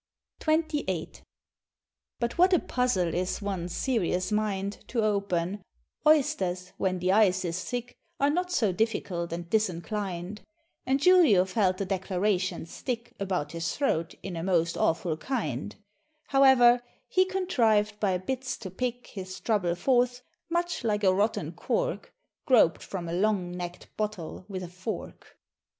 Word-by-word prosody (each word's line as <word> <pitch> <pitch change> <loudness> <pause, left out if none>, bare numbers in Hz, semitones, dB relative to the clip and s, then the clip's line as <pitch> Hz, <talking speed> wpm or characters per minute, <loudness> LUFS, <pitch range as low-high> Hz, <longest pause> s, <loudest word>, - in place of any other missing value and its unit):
XXVIII. 305 - 0 1.1
But 235 -1 -1
what 370 +2 +6
a 355 - +6
puzzle 215 -10 0
is 180 +1 -1
one's 190 -4 -3
serious 185 -7 0
mind 205 -2 -1
To 230 -3 0
open; 200 -2 0 0.5
oysters, 190 - +2
when 185 -1 0
the 180 +1 +1
ice 190 -3 +4
is 175 +2 -2
thick, 245 0 -4 0.2
Are 280 +1 +3
not 360 +3 -1
so 225 - +2
difficult 180 -4 -1
and 170 0 -5
disinclin'd; 195 -1 -2 0.5
And 265 +1 +2
Julio 330 - +6
felt 190 -1 +1
the 195 - -2
declaration 190 -1 -1
stick 235 +7 -5
About 185 -6 -2
his 165 -1 -3
throat 165 - 0
in 190 -3 -5
a 165 - -3
most 170 -2 +1
awful 160 -1 0
kind; 185 - -3 0.5
However, 260 -3 +6 0.3
he 370 - +4
contrived 225 - +1
by 190 -4 +1
bits 255 +8 -3
to 190 -5 -8
pick 245 +4 -3
His 185 -2 -8
trouble 190 -6 +1
forth, 250 +4 +1 0.3
much 345 -3 -1
like 210 -2 0
a 190 -1 +5
rotten 205 +4 0
cork - - -2 0.4
Grop'd 235 - +5
from 180 -3 -5
a 165 - -4
long 190 -1 +1
necked 175 0 -7
bottle 195 -5 -4
with 190 -3 -5
a - - -5
fork. 185 +5 -7
200 Hz, 140 wpm, -28 LUFS, 180-245 Hz, 1.1 s, what